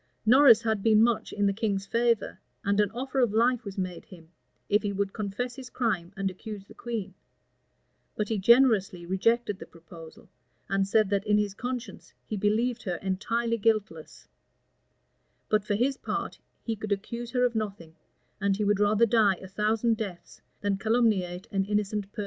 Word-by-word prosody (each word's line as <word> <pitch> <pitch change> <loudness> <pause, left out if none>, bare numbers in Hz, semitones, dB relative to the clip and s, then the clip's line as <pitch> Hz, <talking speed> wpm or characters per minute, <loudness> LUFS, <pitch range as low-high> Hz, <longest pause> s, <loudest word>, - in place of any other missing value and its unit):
Norris 240 -1 +7
had 220 -3 0
been 220 0 +5
much 235 -1 +1
in 205 - 0
the 200 - +2
king's 200 -2 -1
favor, 230 0 0 0.2
and 200 +1 +1
an 205 -1 +3
offer 260 +4 -3
of 240 -5 +2
life 240 +1 +2
was 200 -2 -8
made 185 -2 -4
him, 165 -3 -15 0.4
if 205 +2 +3
he 205 - -2
would 200 0 -2
confess 230 +4 -4
his 260 -2 -9
crime 190 -10 -1
and 195 -1 -1
accuse 205 +1 -9
the - - -15
queen; 220 -5 -5 1.0
but 210 - -1
he 220 -3 0
generously 210 -5 +4
rejected 205 +3 +1
the - - -9
proposal, 165 -1 -14 0.4
and 195 0 0
said 215 0 +2
that 200 +1 0
in 210 0 +4
his 205 -2 0
conscience 250 +3 -6
he 215 - -4
believed 225 +4 0
her 180 -4 -3
entirely 230 +6 -1
guiltless: 200 -7 -1 1.2
but 215 -1 +2
for 205 0 -1
his 260 +5 +1
part, - - -4 0.2
he 225 - -2
could 215 0 -7
accuse 235 +4 -3
her 250 0 +2
of 245 - 0
nothing, 195 -7 -5 0.4
and 200 -1 +1
he 210 - -1
would 205 -1 +2
rather 210 +2 +4
die 215 -3 +3
a 190 - -11
thousand 215 +3 0
deaths 195 -6 -7 0.2
than 200 -1 0
calumniate 205 -5 +1
an 195 -1 +1
innocent 210 0 -2
person. 220 - -10
210 Hz, 180 wpm, -27 LUFS, 195-230 Hz, 1.2 s, Norris